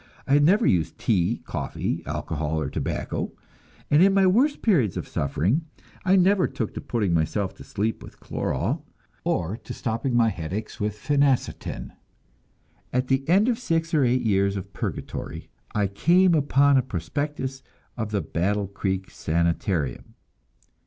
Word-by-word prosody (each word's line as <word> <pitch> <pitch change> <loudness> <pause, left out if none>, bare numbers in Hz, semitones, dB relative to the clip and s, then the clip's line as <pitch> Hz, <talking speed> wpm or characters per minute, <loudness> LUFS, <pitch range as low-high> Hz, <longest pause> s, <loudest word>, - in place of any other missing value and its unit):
I 140 - +1
had 145 0 +5
never 200 +9 +4
used 85 -4 +1
tea, 100 0 +1
coffee, - - -3
alcohol 80 -1 -2
or 75 - -3
tobacco, - - -3 0.6
and 145 +3 +6
in 195 +1 +5
my 195 -1 +5
worst 255 +11 +3
periods 140 - +3
of - - -4
suffering 100 - 0 0.4
I 190 0 +4
never 190 +1 +4
took 110 - -4
to - - -5
putting 105 -7 0
myself 95 +4 0
to - - -10
sleep 110 +2 -2
with - - -12
chloral, - - -2 0.4
or 90 +5 -1
to - - -8
stopping 120 +2 -2
my 115 -1 +4
headaches 95 +3 -5
with 105 0 -2
phenacetin. 140 +2 0 1.0
At 125 +1 0
the 135 +2 +1
end 195 +6 +5
of 240 -2 +1
six 165 -7 -1
or 150 -3 +4
eight 125 0 +2
years 100 -2 +2
of 95 - -6
purgatory, - - -5 0.2
I 105 -1 +2
came 175 - +4
upon 140 -2 +4
a - - +5
prospectus 135 - -3 0.3
of 110 -3 -3
the 105 -2 0
Battle 95 +6 0
Creek 95 -1 -3
Sanitarium. 85 -3 -1
115 Hz, 150 wpm, -25 LUFS, 95-150 Hz, 1.0 s, and